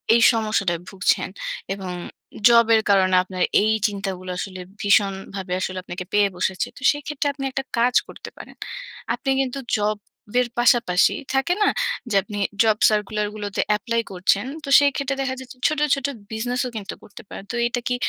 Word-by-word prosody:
এই 235 Hz, -, +4 dB
সমস্যাটায় 200 Hz, -6 st, 0 dB
ভুগছেন। 185 Hz, -1 st, +1 dB, 0.4 s
এবং 190 Hz, -2 st, -6 dB, 0.6 s
জবের 230 Hz, -2 st, +5 dB
কারণে 190 Hz, -2 st, +4 dB
আপনার 185 Hz, -1 st, -3 dB, 0.2 s
এই 215 Hz, -, +3 dB, 0.2 s
চিন্তাগুলো 195 Hz, -2 st, -5 dB
আসলে 185 Hz, -1 st, -5 dB, 0.2 s
ভীষণভাবে 195 Hz, -2 st, +1 dB
আসলে 185 Hz, 0 st, -3 dB
আপনাকে 180 Hz, 0 st, -6 dB
পেয়ে 205 Hz, -1 st, +4 dB
বসেছে। 185 Hz, +1 st, -1 dB
তো -, -, -12 dB
সেক্ষেত্রে 290 Hz, 0 st, -3 dB
আপনি 275 Hz, -1 st, -7 dB
একটা 270 Hz, +1 st, -3 dB
কাজ 245 Hz, +2 st, +2 dB
করতে -, -, -9 dB
পারেন। -, -, -11 dB, 0.6 s
আপনি 270 Hz, -, -4 dB
কিন্তু 270 Hz, +1 st, -3 dB, 0.2 s
জব 210 Hz, 0 st, 0 dB, 0.4 s
এর 250 Hz, -, +2 dB
পাশাপাশি 235 Hz, -7 st, +4 dB, 0.2 s
থাকে 270 Hz, +7 st, +2 dB
না? -, -, +4 dB, 0.4 s
যে 205 Hz, -, -1 dB
আপনি 205 Hz, -1 st, -7 dB, 0.3 s
জব 220 Hz, -2 st, +3 dB
সার্কুলার 210 Hz, 0 st, 0 dB
গুলোতে 205 Hz, -1 st, -2 dB, 0.2 s
এপ্লাই 230 Hz, +1 st, -1 dB
করছেন। 190 Hz, +4 st, +1 dB, 0.2 s
তো 280 Hz, -, -6 dB
সেই 285 Hz, 0 st, +3 dB
ক্ষেত্রে 275 Hz, -1 st, -1 dB
দেখা 260 Hz, -1 st, -2 dB
যাচ্ছে 255 Hz, 0 st, -11 dB
ছোট, 305 Hz, -1 st, -1 dB, 0.2 s
ছোট, 275 Hz, 0 st, -2 dB, 0.2 s
বিজনেসও 245 Hz, +3 st, -2 dB
কিন্তু 200 Hz, -2 st, -5 dB
করতে 205 Hz, -, -12 dB
পারেন। -, -, -8 dB
তো -, -, -4 dB
এটা 245 Hz, +1 st, -2 dB
কি 250 Hz, -, +1 dB
215 Hz, 165 wpm, -22 LUFS, 195-250 Hz, 0.6 s, জবের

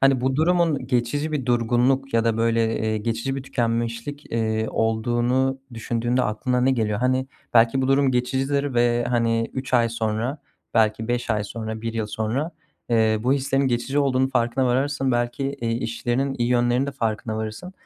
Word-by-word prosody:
hani, 135 Hz, -2 st, +4 dB
bu 130 Hz, +1 st, 0 dB
durumun 160 Hz, -5 st, +2 dB
geçici 130 Hz, +5 st, -1 dB
bir 135 Hz, -4 st, -2 dB
durgunluk 125 Hz, +2 st, +1 dB
ya 115 Hz, 0 st, +3 dB
da 115 Hz, -1 st, +1 dB
böyle, 115 Hz, 0 st, +1 dB
eee, 110 Hz, 0 st, -1 dB
geçici 115 Hz, +5 st, -2 dB
bir 135 Hz, -, -4 dB
tükenmişlik, 115 Hz, +3 st, -3 dB
eee, 110 Hz, -1 st, 0 dB
olduğunu 120 Hz, +4 st, 0 dB
düşündüğünde 120 Hz, +2 st, -1 dB
aklına 125 Hz, +4 st, 0 dB
ne 130 Hz, -, +3 dB
geliyor? 110 Hz, -5 st, 0 dB
Hani, 130 Hz, +1 st, +1 dB, 0.3 s
belki 120 Hz, +3 st, +4 dB
bu 130 Hz, -, 0 dB
durum 135 Hz, 0 st, +3 dB
geçicidir 135 Hz, +2 st, 0 dB
ve, 120 Hz, 0 st, +2 dB
hani, 115 Hz, -1 st, +1 dB
3 130 Hz, -1 st, -3 dB
ay 120 Hz, -1 st, +4 dB
sonra, 115 Hz, +4 st, -2 dB, 0.4 s
belki 110 Hz, 0 st, +2 dB
5 120 Hz, -1 st, -1 dB
ay 105 Hz, -1 st, 0 dB
sonra, 110 Hz, +1 st, -5 dB
1 115 Hz, 0 st, -3 dB
yıl 110 Hz, -2 st, -1 dB
sonra, 110 Hz, +9 st, -2 dB, 0.4 s
eee, 110 Hz, -1 st, +3 dB
bu 125 Hz, -, +2 dB
hislerin 135 Hz, 0 st, +1 dB
geçici 125 Hz, +4 st, -1 dB
olduğunun 130 Hz, -2 st, +2 dB
farkına 125 Hz, +1 st, +1 dB
varırsın. 135 Hz, +1 st, +1 dB
Belki, 120 Hz, +3 st, -1 dB
iii, 115 Hz, 0 st, -1 dB
işinin 120 Hz, +3 st, -1 dB
iyi 120 Hz, 0 st, +1 dB
yönlerinin 120 Hz, +2 st, +2 dB
de 140 Hz, -, -4 dB
farkına 110 Hz, -1 st, -2 dB
varırsın. 110 Hz, -, -5 dB
120 Hz, 170 wpm, -23 LUFS, 115-135 Hz, 0.4 s, hani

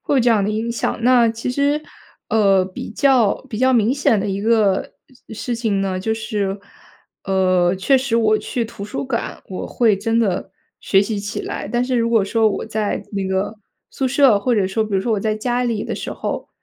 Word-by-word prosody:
会 -, -, -1 dB
有 260 Hz, -, +4 dB
这 240 Hz, 0 st, +3 dB
样 210 Hz, -3 st, +3 dB
的 205 Hz, -, 0 dB
影 225 Hz, +2 st, -2 dB
响。 230 Hz, -, -2 dB
那 245 Hz, -1 st, +5 dB
其 230 Hz, +2 st, -3 dB
实， 285 Hz, +3 st, +1 dB, 0.5 s
呃， 195 Hz, -4 st, +3 dB
比 185 Hz, 0 st, -7 dB
较 245 Hz, -3 st, +3 dB
比 220 Hz, -3 st, -5 dB
较 260 Hz, +1 st, +3 dB
明 230 Hz, 0 st, +3 dB
显 240 Hz, -6 st, +2 dB
的 205 Hz, -, -2 dB
一 195 Hz, 0 st, -2 dB
个 215 Hz, -3 st, +2 dB, 0.4 s
事 240 Hz, +2 st, -3 dB
情 215 Hz, -4 st, -1 dB
呢， 185 Hz, -1 st, -2 dB
就 220 Hz, +3 st, -1 dB
是， 210 Hz, -3 st, -3 dB, 0.7 s
呃， 185 Hz, -2 st, +2 dB
确 265 Hz, +9 st, +3 dB
实 255 Hz, -3 st, 0 dB
我 215 Hz, -2 st, +3 dB
去 240 Hz, -, -3 dB
图 210 Hz, -3 st, -8 dB
书 210 Hz, -, -4 dB
馆， 235 Hz, -3 st, -4 dB
我 185 Hz, -, -5 dB
会 220 Hz, -5 st, +2 dB
真 225 Hz, +3 st, 0 dB
的 195 Hz, -4 st, 0 dB, 0.3 s
学 195 Hz, -, +3 dB
习 205 Hz, -1 st, -3 dB
起 205 Hz, 0 st, -5 dB
来。 -, -, -5 dB
但 240 Hz, +2 st, 0 dB
是 255 Hz, -1 st, -1 dB
如 230 Hz, 0 st, +1 dB
果 225 Hz, -4 st, +3 dB
说， 225 Hz, +1 st, +2 dB
我 -, -, -3 dB
在 215 Hz, -1 st, -2 dB
那 195 Hz, -1 st, -2 dB
个 190 Hz, +3 st, -1 dB, 0.4 s
宿 265 Hz, -1 st, -1 dB
舍 270 Hz, -5 st, +4 dB
或 245 Hz, +3 st, +1 dB
者 200 Hz, -3 st, +2 dB
说 205 Hz, +4 st, 0 dB
比 210 Hz, -2 st, -4 dB
如 190 Hz, -, +2 dB
说 230 Hz, -, 0 dB
我 205 Hz, -, 0 dB
在 215 Hz, 0 st, 0 dB
家 245 Hz, +3 st, -1 dB
里 230 Hz, -4 st, -1 dB
的 -, -, -3 dB
时 -, -, -5 dB
候， -, -, -4 dB
220 Hz, 235 characters per minute, -20 LUFS, 200-240 Hz, 0.7 s, 那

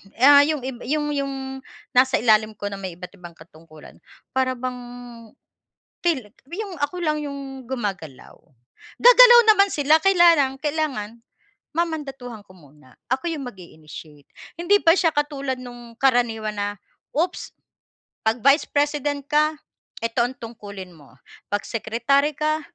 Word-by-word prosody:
Ah, 285 Hz, +3 st, +6 dB
yung 305 Hz, -5 st, -2 dB
ib 260 Hz, -2 st, -6 dB
yung 295 Hz, +1 st, -1 dB
yung 275 Hz, -1 st, -2 dB, 0.6 s
nasa 260 Hz, +1 st, +3 dB
ilalim 215 Hz, -1 st, +2 dB
ko 205 Hz, 0 st, -5 dB
na 195 Hz, -, -7 dB
may 185 Hz, -3 st, -6 dB
iba't 180 Hz, +1 st, -10 dB
ibang 170 Hz, -1 st, -12 dB
katungkulan, 160 Hz, -1 st, -17 dB, 0.3 s
para 260 Hz, -1 st, 0 dB
bang 250 Hz, 0 st, -5 dB, 1.2 s
tila 260 Hz, -12 st, -1 dB, 0.2 s
yung 395 Hz, 0 st, -5 dB
ako 355 Hz, +5 st, -3 dB
lang 305 Hz, -3 st, -1 dB
yung 275 Hz, -2 st, -7 dB
gumagalaw. 200 Hz, -, -6 dB, 0.6 s
Gagalaw -, -, +9 dB
naman 400 Hz, -2 st, +5 dB
sila 305 Hz, +2 st, +2 dB
kaya 345 Hz, -3 st, +6 dB
lang, 270 Hz, -2 st, 0 dB
kailangan 290 Hz, -8 st, -3 dB, 0.6 s
mamandatuhan 275 Hz, -10 st, -4 dB
ko 185 Hz, -, -18 dB
muna. 150 Hz, -5 st, -20 dB, 0.2 s
Ako 265 Hz, +6 st, -1 dB
yung 275 Hz, -4 st, -6 dB
mag-i-initiate. 155 Hz, -, -13 dB, 0.3 s
Hindi 350 Hz, +4 st, +2 dB
pa 330 Hz, +1 st, +6 dB
siya 340 Hz, -4 st, +2 dB
katulad 285 Hz, -2 st, -2 dB
nung 240 Hz, -2 st, -11 dB
karaniwan 230 Hz, -5 st, +1 dB
na, 205 Hz, 0 st, -1 dB, 0.5 s
oops, 335 Hz, +5 st, -2 dB, 0.7 s
'pag 225 Hz, +1 st, 0 dB
Vice 280 Hz, +3 st, +4 dB
President 290 Hz, -1 st, -1 dB
ka, 305 Hz, +1 st, +2 dB, 0.5 s
eto 235 Hz, +1 st, +1 dB
ang 260 Hz, -, -8 dB
tungkulin 205 Hz, -5 st, -10 dB
mo. 145 Hz, -4 st, -19 dB, 0.4 s
'Pag 205 Hz, -, 0 dB
secretary 260 Hz, +6 st, 0 dB
ka, 310 Hz, +1 st, 0 dB
265 Hz, 135 wpm, -22 LUFS, 215-300 Hz, 1.2 s, Gagalaw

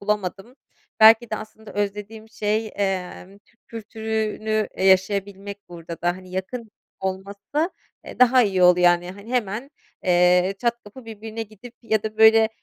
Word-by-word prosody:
bulamadım. 205 Hz, +3 st, -3 dB, 0.4 s
Belki 225 Hz, +1 st, +7 dB
de 215 Hz, -, -1 dB
aslında 220 Hz, 0 st, -11 dB
özlediğim 210 Hz, +2 st, -4 dB
şey, 215 Hz, 0 st, -2 dB
emm, 195 Hz, 0 st, -3 dB
Türk 205 Hz, +3 st, -35 dB
kültürünü, 220 Hz, -1 st, -3 dB
e, -, -, -4 dB
yaşayabilmek 200 Hz, +1 st, +1 dB
burada 170 Hz, -1 st, -9 dB
da. 175 Hz, -, +2 dB
Hani, 185 Hz, -1 st, -13 dB
yakın 215 Hz, +5 st, -5 dB, 0.3 s
olması, 200 Hz, -, -3 dB, 0.3 s
eee, -, -, -11 dB
daha 250 Hz, 0 st, +6 dB
iyi 190 Hz, -4 st, +1 dB
oldu 180 Hz, 0 st, +6 dB
yani, 175 Hz, 0 st, +3 dB
hani, 200 Hz, +5 st, -12 dB
hemen, 240 Hz, +2 st, -2 dB, 0.3 s
eee, 180 Hz, +1 st, +3 dB
çat 235 Hz, +1 st, 0 dB
kapı 220 Hz, +5 st, -13 dB
birbirine 225 Hz, 0 st, -7 dB
gidip 220 Hz, +2 st, -13 dB
ya 220 Hz, -2 st, 0 dB
da, 215 Hz, -1 st, -5 dB
böyle, 220 Hz, 0 st, +7 dB
210 Hz, 145 wpm, -23 LUFS, 190-220 Hz, 0.4 s, Belki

